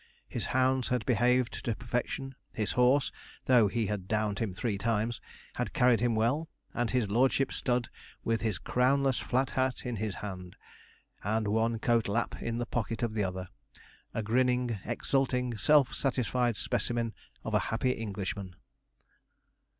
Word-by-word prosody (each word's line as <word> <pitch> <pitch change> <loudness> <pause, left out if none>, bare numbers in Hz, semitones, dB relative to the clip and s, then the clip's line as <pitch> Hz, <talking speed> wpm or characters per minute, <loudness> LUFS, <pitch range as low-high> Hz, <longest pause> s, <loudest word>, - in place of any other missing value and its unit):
His - - -3
hounds 130 0 +2
had 125 -3 0
behaved 125 +1 +2
to 115 - -1
perfection; 125 +3 -3 0.2
his 110 -2 -2
horse 125 +3 +3 0.3
though 120 -5 +6
he 115 +2 0
had 100 -2 -3
downed 105 -1 0
him 110 -4 -1
three 100 +2 -2
times 115 +1 0 0.3
had - - -3
carried 125 -3 +4
him 120 -1 +1
well, 130 +9 +1 0.2
and 120 -2 0
his 120 -6 0
lordship 130 +4 +3
stood 120 -2 0 0.4
with 115 -1 0
his 110 -5 0
crownless 130 - +2
flat 130 +1 0
hat 130 0 0
in 120 -2 -2
his 105 -2 -2
hand, 90 -3 -7 0.7
and 110 +1 0
one 115 +2 +1
coat 115 -1 +2
lap 115 +4 -1
in 115 0 -2
the 120 - -1
pocket 115 0 -2
of 115 -2 0
the 105 -2 0
other 90 -1 -4 0.6
a 115 - -2
grinning, 125 0 +1
exulting, 125 0 0
self 140 +5 +4
satisfied 125 -3 0
specimen 115 -2 -1 0.3
of - - -4
a - - +5
happy 115 +3 +1
Englishman. 100 -4 -4
115 Hz, 155 wpm, -30 LUFS, 110-125 Hz, 0.7 s, though